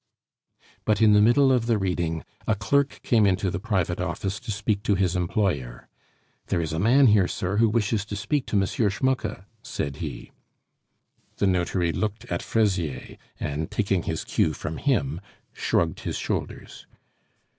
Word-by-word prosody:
But 105 -2 +1
in 110 -2 +6
the 105 - +6
middle 130 +5 +5
of 120 -3 +2
the 115 -2 +3
reading 85 -4 -1 0.2
a 110 - +3
clerk 140 +7 0
came 110 -4 +4
into 95 0 +1
the 100 - -3
private 95 -5 -1
office 100 +2 -3
to - - -12
speak 100 0 -1
to 105 - +1
his 95 -2 +1
employer. 85 - -1 0.6
"There - - 0
is 80 -1 -2
a 80 - -1
man 125 +8 +5
here, 105 -5 +5
sir, 95 +3 -2
who 115 0 +4
wishes 105 -1 0
to 105 - -5
speak 140 +7 -1
to 105 - 0
M. 95 - +2
Schmucke," 110 0 -1 0.2
said 70 -1 -4
he. - - -6 1.1
The - - +1
notary 90 -2 +1
looked 105 +4 -3
at 85 - -1
Fraisier, 90 - -1 0.2
and, 75 +2 -3
taking 100 -4 0
his 80 -1 -3
cue 75 - +1
from 75 +2 -5
him, 85 - 0 0.3
shrugged - - 0
his - - -4
shoulders. - - -5
100 Hz, 165 wpm, -25 LUFS, 85-110 Hz, 1.1 s, in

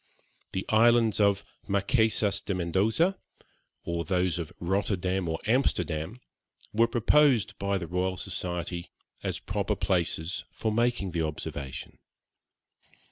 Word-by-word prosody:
The 95 - -2
islands 115 0 +4
of 100 -1 +3 0.2
Marquesas 100 0 +2
de 100 - -2
Mendoza, 105 - +1 0.7
or 85 0 -1
those 90 +1 0
of 80 - -4
Rotterdam 95 -1 0
or 80 - -1
Amsterdam, 110 - 0 0.5
were 115 +2 +4
proposed 120 -3 +3
by 100 0 0
the 90 - -4
Royal 90 +2 -1
Society 90 -2 -4 0.3
as - - -2
proper 100 +1 -2
places 90 -3 0
for 110 - -2
making 115 -4 +1
the 85 -1 -1
observation. 70 -3 -5
95 Hz, 115 wpm, -28 LUFS, 85-110 Hz, 0.7 s, islands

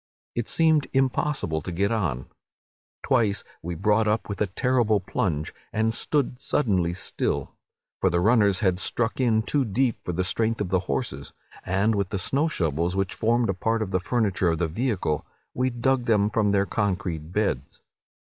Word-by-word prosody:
It 120 -2 -3
seemed 160 -3 +3
impossible 135 - 0
to 90 - -5
get 100 +5 0
on. 80 - -1 0.8
Twice 115 -7 +2 0.2
we 85 +1 -4
brought 105 +5 +2
up 105 +1 0
with 100 - -5
a 105 - +3
terrible 115 0 +2
plunge, 80 -5 -2 0.2
and 110 +1 +1
stood 130 0 -1
suddenly 100 -12 +1
still; 90 - -2 0.5
for 95 - +3
the 85 0 +1
runners 105 -1 +3
had 95 -2 +2
struck 115 +5 -1
in 115 -4 +3
too 140 +4 +1
deep 120 +1 0
for - - -3
the 90 +2 -1
strength 115 +4 0
of 105 - -2
the 95 - +2
horses; 70 0 -3 0.3
and 100 +4 +1
with 100 -2 -1
the 100 - -2
snow 135 - 0
shovels, 85 - -1
which 95 -1 -1
formed 115 0 +1
a - - -3
part 115 +3 0
of 95 - -6
the 95 - +2
furniture 100 -3 +1
of 80 - 0
the 85 - 0
vehicle, 95 - -1 0.3
we 130 +1 +1
dug 125 +1 0
them 105 -2 +3
from 105 -2 +2
their 100 -1 +3
concrete 90 -7 -2
beds. 90 -10 -1
105 Hz, 175 wpm, -25 LUFS, 90-120 Hz, 0.8 s, seemed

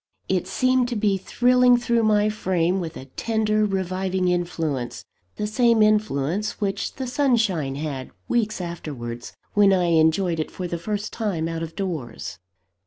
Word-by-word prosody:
It 185 -1 0
seemed 255 +5 +2
to 240 - -3
be 210 -2 +2
thrilling 250 +4 +4
through 235 -1 +1
my 210 -1 +3
frame 185 -4 0
with 165 -3 -5
a 130 - -9
tender, 215 - 0
reviving 190 -1 -1
influence 165 -8 -2 0.3
the 210 - -2
same 230 +1 +3
influence 210 -3 +1
which 200 -1 -2
the 265 - -4
sunshine 225 - +1
had, 140 -3 -4 0.2
weeks 220 -4 0
afterwards, 140 -9 -6 0.2
when 205 -1 +5
I 180 -2 +2
enjoyed 165 +2 +3
it 155 - -2
for 185 - -5
the 170 -1 -4
first 210 +4 -3
time 195 -8 -1
out 165 0 -4
of 165 0 -6
doors. 150 - -5
190 Hz, 155 wpm, -24 LUFS, 165-215 Hz, 0.3 s, when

